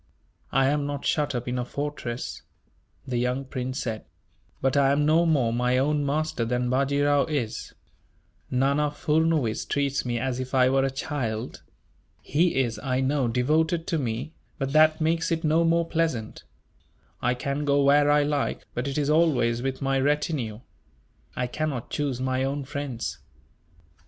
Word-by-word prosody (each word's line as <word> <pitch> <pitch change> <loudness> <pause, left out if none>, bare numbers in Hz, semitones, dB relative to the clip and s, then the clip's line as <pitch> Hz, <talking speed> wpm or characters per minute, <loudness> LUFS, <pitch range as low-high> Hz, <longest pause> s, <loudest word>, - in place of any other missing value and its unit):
"I 135 0 +3
am 145 0 0
not 145 -1 -4
shut 145 -3 +1
up 120 0 -3
in 125 0 -1
a - - 0
fortress," 135 -3 -5 0.6
the 125 -2 -1
young 125 +2 -1
prince 130 0 -4
said, 110 -2 -4 0.6
"but 135 0 +1
I 140 -1 +4
am 145 +1 +2
no 165 +3 +4
more 130 -8 +2
my 125 +1 +1
own 145 +2 +1
master 150 -2 -1
than 125 +1 -1
Bajee 140 +2 +1
Rao 145 -1 +3
is. 140 -8 -3 0.7
Nana 140 +3 +2
Furnuwees 150 -5 +1
treats 140 -1 -1
me 120 -1 -2
as 130 +1 -2
if 130 +1 -4
I 130 -1 +5
were 135 0 +3
a 135 - +1
child. 130 -4 -4 0.6
He 165 +5 +1
is, 120 -4 0
I 130 -2 -1
know, 135 -1 +1
devoted 155 +8 +1
to 165 - -1
me; 125 +4 -3 0.2
but 135 -2 -3
that 155 +1 +5
makes 165 +2 +1
it 165 0 0
no 160 +2 +3
more 165 0 +2
pleasant. 160 -11 -2 0.8
I 125 0 +1
can 140 +3 -2
go 140 -1 +3
where 145 +1 +5
I 145 0 +4
like, 145 -1 -1
but 120 +3 -2
it 140 - -3
is 145 -2 +1
always 135 -8 +2
with 135 +1 -3
my 135 0 +1
retinue. 135 -5 -1 0.7
I 125 - -1
cannot 135 -1 -3
choose 140 -4 -1
my 130 0 0
own 140 +1 -2
friends." 140 -4 -4
140 Hz, 165 wpm, -26 LUFS, 125-150 Hz, 0.8 s, I